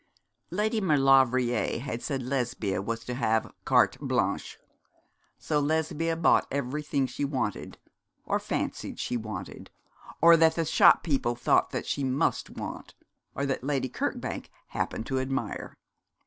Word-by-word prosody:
Lady 215 +4 0
Maulevrier 135 - +3
had 120 -2 -5
said 135 -4 -3
Lesbia 120 -7 -1
was 115 +3 -4
to 125 - -4
have 110 -3 0
carte - - +3
blanche; - - -1 0.8
so 150 -2 0
Lesbia 160 +2 0
bought 165 0 +3
everything 140 +1 -1
she 130 +3 -4
wanted, 140 -2 -3 0.5
or - - 0
fancied - - -4
she - - -2
wanted, 110 -2 -6 0.5
or 170 +1 +8
that 160 0 +4
the 165 - 0
shop - - +5
people 130 -6 0
thought 120 - +1
she 140 - -2
must 130 +1 0
want, - - -8 0.4
or 140 - -1
that 135 -2 -2
Lady 135 -2 -1
Kirkbank - - -4 0.2
happened 110 - -3
to 130 +1 -1
admire. 130 +1 -4
135 Hz, 135 wpm, -28 LUFS, 125-150 Hz, 0.8 s, or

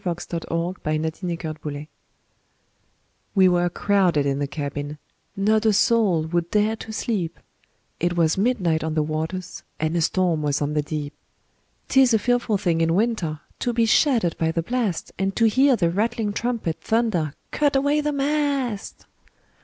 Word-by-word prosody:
W 180 - -1
X. 170 - -6
Y 170 - 0
Z - - -11
Ballad 165 -2 -2
of - - -23
the 175 -2 -2
Tempest 155 -2 -6 1.7
WE 190 -2 +6
were 175 -1 +2
crowded 180 -6 +2
in 140 0 0
the 145 - -1
cabin, 145 0 -5 0.4
Not 215 +2 +2
a 220 -1 +4
soul 200 -6 +3
would 170 +1 -1
dare 215 +1 +2
to 220 - -8
sleep, 205 -5 -2 0.6
It 175 +1 0
was 160 -2 +3
midnight 190 -7 +1
on 160 -1 -2
the 155 - +2
waters, 160 +4 -4 0.2
And 155 +2 -1
a 170 - +2
storm 170 -1 +1
was 145 -1 0
on 145 0 -1
the 150 - +1
deep. 150 -1 -5 0.7
'Tis 265 -3 +5
a - - +6
fearful 240 -1 +1
thing 170 -3 0
in 165 0 +2
winter 190 -8 0 0.2
To 245 - -1
be 230 0 +3
shattered 225 - +3
by 160 0 +1
the 165 0 -1
blast, 230 -4 -2
And 195 0 -1
to 230 - +3
hear 260 +4 +4
the 170 -6 +1
rattling 215 +2 -1
trumpet 230 -8 -2
Thunder, 215 -10 0 0.2
"Cut 290 -2 +1
away 285 +2 +2
the 295 0 -1
mast!" 280 -6 -1
185 Hz, 175 wpm, -23 LUFS, 160-230 Hz, 1.7 s, WE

